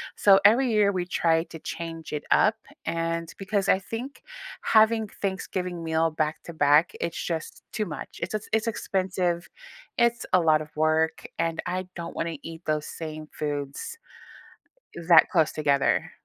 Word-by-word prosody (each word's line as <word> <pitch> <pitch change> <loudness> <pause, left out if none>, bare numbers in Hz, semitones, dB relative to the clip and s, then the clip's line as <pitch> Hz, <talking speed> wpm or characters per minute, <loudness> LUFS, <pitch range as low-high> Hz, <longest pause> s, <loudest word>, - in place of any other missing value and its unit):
So, 195 -1 +6
every 240 +3 +5
year 210 -2 +4
we 180 -2 -2
try 165 -2 +2
to 165 - -10
change 165 -1 -6
it 150 - -3
up. - - +5 0.3
And 165 0 -2
because 195 0 -1
I 190 - +5
think 245 +7 -7 0.4
having 220 0 +4
Thanksgiving 180 -3 -3
meal 160 0 +1
back-to-back, 155 0 +2
it's 170 - -3
just 165 -2 -4
too 215 -2 -1
much. 155 - -8
It's - - -3
eh - - 0
it's 220 +1 +2
expensive. 185 -4 -1 0.5
It's 235 0 +2
a 185 - +7
lot 155 -2 +3
of 150 - -8
work, 155 +1 +1
and 165 -1 -1
I 185 +1 -3
don't 170 -1 -6
wanna 165 -2 -3
eat 165 +1 -9
those 155 -1 0
same 155 -1 -7
foods 145 - -4 1.1
that 165 -2 +8
close 160 -4 +3
together. 140 -2 +1
170 Hz, 150 wpm, -26 LUFS, 160-195 Hz, 1.1 s, that